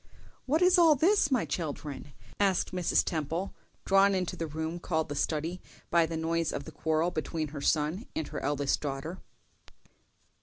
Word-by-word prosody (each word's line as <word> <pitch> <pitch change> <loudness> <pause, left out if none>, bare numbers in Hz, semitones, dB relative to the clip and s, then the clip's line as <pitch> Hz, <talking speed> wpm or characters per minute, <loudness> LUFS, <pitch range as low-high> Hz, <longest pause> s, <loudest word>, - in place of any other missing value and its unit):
"What 310 +6 +3
is 365 0 +6
all 325 -3 +7
this, 340 +2 +3
my 255 -4 +2
children?" 145 -4 -5 0.3
asked 195 -3 +2
Mrs. 180 -2 +2
Temple, 165 +4 -2 0.3
drawn 195 0 +5
into 185 -2 -1
the 165 - -3
room 160 +3 -4
called 160 -3 -1
the 145 - -3
study 160 +5 -2 0.3
by 170 -1 +4
the 165 0 -4
noise 165 0 0
of 140 - -4
the - - -10
quarrel 160 +2 0
between 155 0 -3
her 145 -1 -7
son 155 - 0
and 160 - -2
her - - -4
eldest 145 0 0
daughter. 145 +5 -4
165 Hz, 165 wpm, -29 LUFS, 150-190 Hz, 0.3 s, all